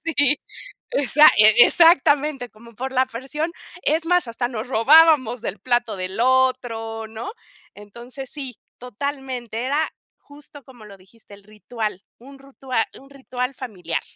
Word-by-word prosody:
sí, 290 -3 +1 0.5
exac 295 +2 +5
exactamente, 275 +3 +5
como 235 +2 -17
por 260 +4 -5
la 260 0 +2
porción, 270 +7 -5 0.3
es 320 +2 0
más, 355 -6 +2
hasta 240 +1 -3
nos 235 0 -6
robábamos 260 -1 +4
del 195 - -5
plato 240 -1 -1
del 185 +2 -5
otro, 245 -4 0
¿no?, 220 - -7 0.4
entonces, 240 +6 -10
sí, 270 -6 -7 0.2
totalmente, 250 -2 -6
era 295 +4 0 0.3
justo 290 0 -16
como 245 -4 -16
lo 200 -1 -13
dijiste, 200 +3 -20
el 200 - -20
ritual, 210 -1 -6 0.2
un 270 +3 -15
ritual 265 -4 -3 0.2
un 275 +1 -18
ritual 255 -1 -5
familiar. 185 -10 -5
250 Hz, 135 wpm, -21 LUFS, 225-275 Hz, 0.5 s, exac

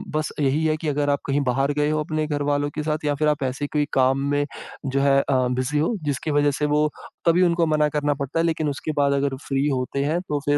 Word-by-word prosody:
बस 155 0 -1
यही 145 +2 +1
है 155 -1 +2
कि 155 - -5
अगर 145 0 0
आप 140 0 +2
कहीं 140 +1 +1
बाहर 135 +3 +1
गए 150 0 +2
हो 155 0 0
अपने 155 -1 -2
घरवालों 145 -1 0
के 150 - -2
साथ 155 0 -2
या 145 -1 +1
फिर 150 +2 +1
आप 150 -1 +1
ऐसे 135 +2 -2
कोई 150 -1 +2
काम 130 +1 +3
में 145 0 +1 0.4
जो 135 0 0
है 140 0 +4
अ, 130 -3 +1
बिज़ी 130 +4 0
हो 165 +10 +1
जिसकी 145 +1 -2
वजह 145 0 +3
से 150 - +1
वो 150 +1 +2 0.4
तभी 170 +2 +5
उनको 170 -1 +3
मना 150 0 +2
करना 145 0 +1
पड़ता 140 +4 -2
है 165 - +2
लेकिन 160 -2 0
उसके 145 +2 -3
बाद 140 -1 +3
अगर 140 -1 0
फ्री 135 +1 +1
होते 135 +1 -1
हैं 160 +4 0
तो 145 - 0
फिर 145 0 +3
145 Hz, 255 wpm, -23 LUFS, 140-155 Hz, 0.4 s, तभी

